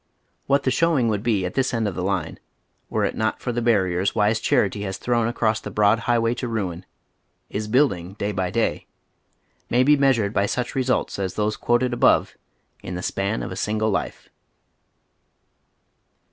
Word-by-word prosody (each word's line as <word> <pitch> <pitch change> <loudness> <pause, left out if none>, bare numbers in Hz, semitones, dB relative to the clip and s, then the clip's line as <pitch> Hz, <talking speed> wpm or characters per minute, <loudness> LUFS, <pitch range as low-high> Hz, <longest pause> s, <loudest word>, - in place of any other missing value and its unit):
What 140 0 +2
the 130 - +1
showing 145 -4 +2
would 105 -2 -1
be 105 -5 0
at 90 - -4
this 135 -2 0
end 115 -2 0
of 100 - -3
the 90 - -4
line 95 -3 -2 0.5
were - - 0
it - - -2
not 110 0 -1
for 125 - -3
the 120 0 -2
barriers 95 -5 +1
wise 110 0 +2
charity 100 -2 +1
has 95 -2 -4
thrown 120 -2 0
across 110 -2 0
the - - -7
bn>ad 105 +1 +3
highway 115 0 +1
to 125 0 -4
ruin— 95 -6 -4 0.6
is 105 +1 -3
building 105 -8 +1
day 105 0 -3
by 95 -2 -2
day 115 +2 -1 0.4
— - - -43
may 125 +2 +3
be 150 +3 +5
Beanired 130 -7 +2
by 100 0 +1
such 125 +2 -2
results 130 -5 -1
as 95 -2 -3
those 105 0 0
quoted 120 +1 +1
above 120 - +3 0.5
in 90 - -6
the 90 - -5
span 100 +3 -2
of - - -5
ft - - -5
single 110 +1 0
life. - - -3
110 Hz, 185 wpm, -23 LUFS, 100-120 Hz, 0.6 s, be